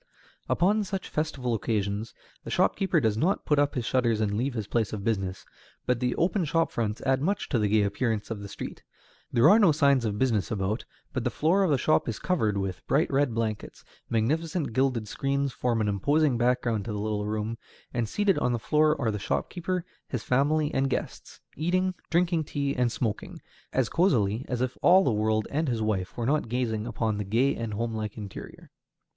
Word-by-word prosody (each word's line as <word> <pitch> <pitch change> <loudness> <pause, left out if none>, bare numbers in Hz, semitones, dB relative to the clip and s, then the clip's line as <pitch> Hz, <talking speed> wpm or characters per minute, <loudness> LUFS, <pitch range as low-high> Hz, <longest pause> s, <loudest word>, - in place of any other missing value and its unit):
Upon 210 +4 +2
such 195 -1 -4
festival 140 -6 -2
occasions 105 -1 -2 0.3
the - - -7
shopkeeper 190 -4 +2
does 110 -6 +1
not 185 +9 +1
put 150 -1 +2
up 145 0 +1
his 125 -3 -2
shutters 120 -4 +1
and 105 -2 0
leave 125 +4 -1
his 110 -3 -2
place 110 0 -1
of 100 -2 -4
business, 95 -4 -2 0.4
but 125 -2 +1
the 125 0 0
open 185 +3 +1
shop 165 +1 +1
fronts 110 0 -2
add 135 0 +2
much 195 +7 -1
to 125 - +1
the 105 - +2
gay 105 0 +3
appearance 105 +2 -1
of 110 - -3
the 100 - -7
street. - - -7 0.5
There 120 +4 +5
are 205 +7 +7
no 200 -7 +6
signs 140 -4 +3
of 105 -2 -1
business 110 -8 +1
about, 105 +1 -2 0.3
but 130 - -2
the 125 - +1
floor 165 - +2
of 190 - +3
the 145 - +3
shop 140 0 +2
is 115 - -3
covered 110 - 0
with 95 -2 -3
bright 155 +4 +2
red 135 -4 +1
blankets; 110 -2 -3 0.3
magnificent 150 +6 0
gilded 130 -3 +1
screens 140 +3 -1
form 115 -1 0
an 105 - +1
imposing 140 +8 +2
background 120 -3 +1
to 115 - -4
the 105 - -3
little 105 0 -2
room; 110 +2 -3 0.3
and 120 -3 -1
seated 205 -2 +2
on 125 - +1
the - - +1
floor 150 +5 +2
are 115 -5 +1
the 105 - -3
shopkeeper, 180 - -2 0.2
his 125 -5 -4
family, 145 +4 +1
and 135 0 +1
guests, - - -5
eating, 185 +4 +1 0.2
drinking 170 -2 +2
tea, 140 -1 -2
and 125 -2 +1
smoking, 115 -3 -3 0.3
as 130 -3 +1
cosily 120 - +1
as 125 -1 -1
if 130 0 -2
all 185 +2 +6
the 130 - +2
world 110 0 +1
and 155 +3 0
his 115 -4 -1
wife 100 -3 -2
were 120 - -1
not 145 -2 +1
gazing 115 -3 -1
upon 110 -2 -1
the - - -1
gay 115 +8 +2
and 115 -2 -4
homelike 110 -1 -3
interior. 100 -3 -9
120 Hz, 200 wpm, -27 LUFS, 110-150 Hz, 0.5 s, are